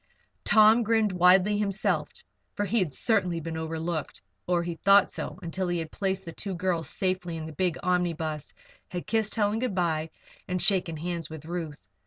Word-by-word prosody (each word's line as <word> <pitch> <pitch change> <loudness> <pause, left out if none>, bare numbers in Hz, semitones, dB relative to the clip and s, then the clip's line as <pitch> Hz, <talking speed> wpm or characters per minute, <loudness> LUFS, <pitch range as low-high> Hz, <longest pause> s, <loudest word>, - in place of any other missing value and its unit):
Tom 220 +2 +6
grinned 220 -2 +2
widely 185 +3 +4
himself, 200 -1 0 0.4
for 205 - -1
he 225 +4 +1
had 180 -6 0
certainly 180 - +1
been 165 0 -5
overlooked. 160 0 -3 0.3
Or, 175 -1 +2
he 170 -1 -4
thought 200 0 +6
so - - -3
until 180 +2 -3
he 175 0 0
had 160 -1 -4
placed 190 -1 -2
the 165 - -6
two 195 +3 -5
girls 175 -2 -1
safely 185 -3 -2
in 160 - -5
the 160 - -7
big 175 +2 -1
omnibus, 165 -4 -1 0.4
had 175 -1 -5
kissed 220 -2 0
Helen 210 0 +1
good 245 -6 -2
bye, 160 -3 0 0.4
and 180 0 -1
shaken 180 -4 +1
hands 170 -1 -4
with 155 -1 -9
Ruth. 160 - -6
180 Hz, 180 wpm, -27 LUFS, 165-195 Hz, 0.4 s, Tom